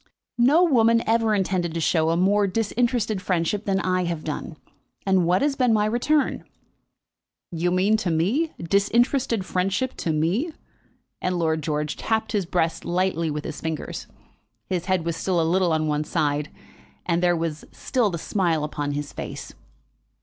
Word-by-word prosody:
"No 290 +9 +5
woman 230 -7 +4
ever 225 -1 +3
intended 180 -4 -1
to - - -1
show 160 0 +2
a 165 - +1
more 200 +3 +3
disinterested 225 0 0
friendship 185 +3 -1
than 195 -1 +1
I 185 -1 0
have 170 -2 -3
done; 155 0 -5 0.5
and 190 -3 +3
what 180 +6 +3
has 285 -1 +1
been 250 -4 +3
my 210 -1 +3
return?" 250 +7 +1 1.1
"You 175 +1 0
mean 190 +4 +3
to 195 -4 -2
me? 210 - +1
disinterested 225 - +1
friendship 195 +9 -1
to 165 - -1
me?" 180 - 0 0.7
And 180 0 -1
Lord 160 -2 0
George 150 0 -2
tapped 220 -1 -1
his 200 -5 -1
breast 165 -2 0
lightly 175 -2 0
with 150 0 -3
his - - -6
fingers. 160 -2 -4 0.6
His 180 -2 -2
head 185 -3 0
was 170 -1 -1
still 180 0 0
a - - +3
little 180 +1 +2
on 155 0 +1
one 150 0 0
side, 150 -1 -1 0.6
and 170 -1 +1
there 175 -1 +3
was 160 -2 -3
still 245 -5 0
the 170 - -3
smile 170 -3 0
upon 145 -1 -3
his 145 0 -4
face. - - -7
185 Hz, 165 wpm, -24 LUFS, 165-215 Hz, 1.1 s, No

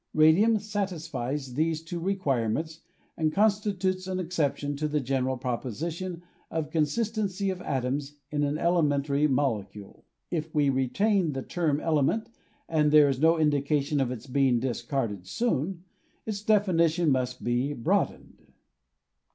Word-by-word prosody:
Radium 170 +9 +5
satisfies 165 - -3
these 160 +3 0
two 170 +1 -5
requirements 160 - -1 0.3
and 155 -1 0
Constitutes 195 -2 +1
an 185 0 -2
exception 150 -5 -1
to 150 +1 -1
the 150 0 0
general 130 -1 -1
proposition 160 - -4 0.3
of 160 -2 -3
consistency 200 +4 0
of 185 -1 -6
atoms 140 +1 -2 0.2
in 145 -1 0
an 145 0 0
elemen 155 -5 +2
tary 145 +1 +2
molecule. 110 -8 -2 0.3
If 160 -2 -3
we 145 -2 +3
retain 165 - +1
the 135 -1 -4
term 155 -5 0
element, 165 - 0 0.4
and 155 -2 +2
there 150 -1 +6
is 135 -2 -1
no 165 +1 +5
indication 145 -1 +1
of 130 - 0
its 125 -1 -6
being 130 -2 +2
discarded 120 -6 -3
soon, 180 - -1 0.4
its 210 -2 -3
definition 175 -6 +3
must 125 -1 -1
be 120 +4 0
broadened. 115 - -1
150 Hz, 135 wpm, -27 LUFS, 135-180 Hz, 0.4 s, there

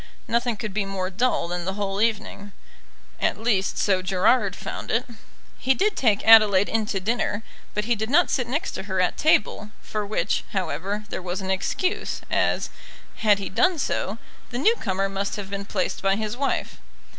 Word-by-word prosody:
Nothing 235 -1 0
could 210 -1 -5
be 210 0 0
more 195 -1 -3
dull 225 -1 +1
than 175 0 -3
the 190 +1 -2
whole 200 -1 -2
evening. 210 -2 -1 0.7
At - - +1
least 215 -4 0
so 190 -2 +2
Gerard 195 +3 +2
found - - -6
it. 230 +2 +1 0.5
He 265 +1 +2
did 410 +4 +1
take 215 -5 +2
Adelaide 210 -3 +7
in 225 -1 0
to 195 - -1
dinner, 220 +1 -1 0.3
but 210 0 0
he 240 - +2
did 220 0 -3
not 345 +6 +4
sit 250 -3 0
next 290 +7 -2
to - - -5
her 190 0 0
at 180 - +2
table, 215 -8 +2
for 215 -1 -3
which, 210 0 -1
however, 200 +2 -2
there - - -4
was 180 0 -3
an 190 0 -2
excuse, 365 - -1
as, - - +1 0.5
had 210 -2 +4
he 200 - -4
done 365 - +2
so, 215 -7 -2 0.3
the 240 - -4
new 370 - +4
comer 195 -2 -1
must 195 +1 -3
have 200 -2 -6
been 200 0 -4
placed 195 -3 -2
by 195 0 +2
his 215 +1 -3
wife. 275 +2 -2
210 Hz, 190 wpm, -24 LUFS, 195-230 Hz, 0.7 s, Adelaide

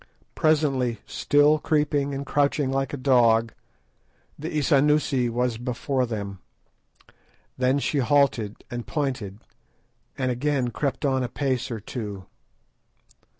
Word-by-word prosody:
Presently, 140 -7 +1
still 145 +1 +3
creeping 145 -2 0
and 140 +1 -4
crouching 145 -1 +1
like 135 0 -1
a 145 - -4
dog, 115 -4 +3 0.8
the 155 +3 -6
Isanusi 145 -3 +2
was 120 -1 -1
before 125 +1 -1
them. 100 -4 -5 1.2
Then 130 +2 +2
she 140 +1 0
halted 125 -5 +1
and 120 -1 -5
pointed, 130 -10 -3 0.8
and 130 -1 0
again 130 -1 0
crept 135 +3 -2
on 135 -1 +1
a 125 - -2
pace 130 -3 -1
or 115 -3 -4
two. 105 -3 -6
130 Hz, 115 wpm, -25 LUFS, 120-145 Hz, 1.2 s, still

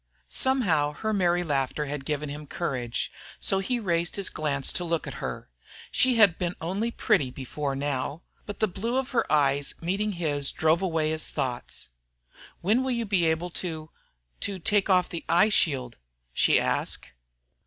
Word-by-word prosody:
Somehow 170 - +2
her 220 +7 -2
merry 175 -3 +2
laughter 145 -1 0
had 145 -1 -5
given 150 0 -2
him 145 +1 -7
courage, 125 -9 -2 0.3
so 195 - +1
he 240 +6 -1
raised 170 -5 0
his 200 -1 -2
glance 140 -3 0
to 180 - -2
look 165 -1 -1
at - - -5
her. - - -4 0.4
She 255 -1 +4
had 205 -7 +5
been 175 -1 -1
only 195 +8 -1
pretty 200 - +2
before. 135 +2 -4
Now! 140 +3 -2 0.2
But 205 - -6
the 215 - +4
blue 225 +7 -2
of 265 0 -1
her 250 - +1
eyes 145 -1 +2
meeting 200 +5 -1
his 145 -5 0
drove 160 +2 +2
away 160 -4 +1
his 160 0 -1
thoughts. 125 - -3 0.7
"When 215 +8 +3
will 260 - -1
you 235 -2 0
be 195 -5 +2
able 160 +2 0
to 160 -3 -5 0.5
to 200 -1 -2
take 205 +3 +1
off 185 -1 +4
that 170 - -4
eye 180 +5 +5
shield?" 135 - +1 0.4
she - - +4
asked. - - -2
170 Hz, 170 wpm, -27 LUFS, 145-200 Hz, 0.7 s, had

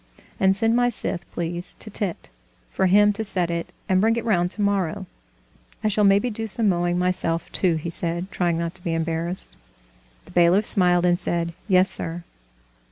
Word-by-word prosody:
"And 190 0 +4
send 225 +2 +2
my 245 0 +3
scythe, 195 -6 -4
please, 175 +1 -4
to 215 - -7
Tit, 195 - -4 0.4
for 190 - +1
him 205 +2 +5
to 220 - -3
set 185 -5 -1
it, 170 0 -4 0.2
and 185 0 +3
bring 225 +2 +3
it 235 - -3
round 175 -6 +2
tomorrow. 200 -2 -1 0.8
I 215 - +2
shall 210 0 +1
maybe 200 +4 +4
do 225 +1 -4
some 220 +1 0
mowing 175 -2 +1
myself 180 -2 -1
too," 180 -4 +1
he 160 +2 -4
said, 170 +3 -2
trying 175 -2 0
not 170 0 -3
to 175 - -8
be 165 -1 -1
embarrassed. 165 +2 -2 0.7
The - - -15
bailiff 175 +4 +4
smiled 180 -4 +3
and 175 0 +2
said: 170 -1 -2
"Yes, 190 -1 +4
sir." 170 +1 -5
180 Hz, 180 wpm, -23 LUFS, 170-205 Hz, 0.8 s, him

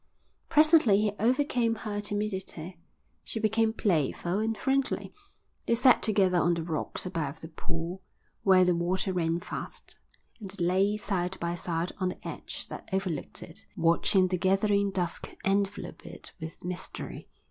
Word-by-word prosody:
Presently 305 - +6
he 210 -1 +2
overcame 245 -1 +2
her 210 -2 -4
timidity. 190 -5 -4 0.4
She 225 - -3
became 220 +1 +2
playful 175 -2 0
and 220 0 0
friendly. 270 0 0 0.5
They 235 - +4
sat 250 +2 +6
together 195 -4 +3
on 175 0 +3
the 165 - -3
rocks 160 +1 -3
above 165 -6 -3
the 160 - -8
pool, 170 +2 -5 0.4
where 185 -2 +6
the 180 - +4
water 180 +3 0
ran 170 -1 0
fast, - - -7 0.4
and 200 -4 -7
they 185 -2 -2
lay 195 +4 +3
side 190 -3 -2
by 170 0 -1
side 170 0 -2
on 185 -1 +1
the - - -6
ledge - - -6
that - - -8
overlooked 190 -6 -2
it, - - -11
watching 185 +3 +4
the 180 -1 -1
gathering 200 +2 +3
dusk 180 -3 -2 0.2
envelop 200 +1 -1
it - - -9
with 160 +1 -8
mystery. 180 0 -5
190 Hz, 150 wpm, -29 LUFS, 175-210 Hz, 0.5 s, Presently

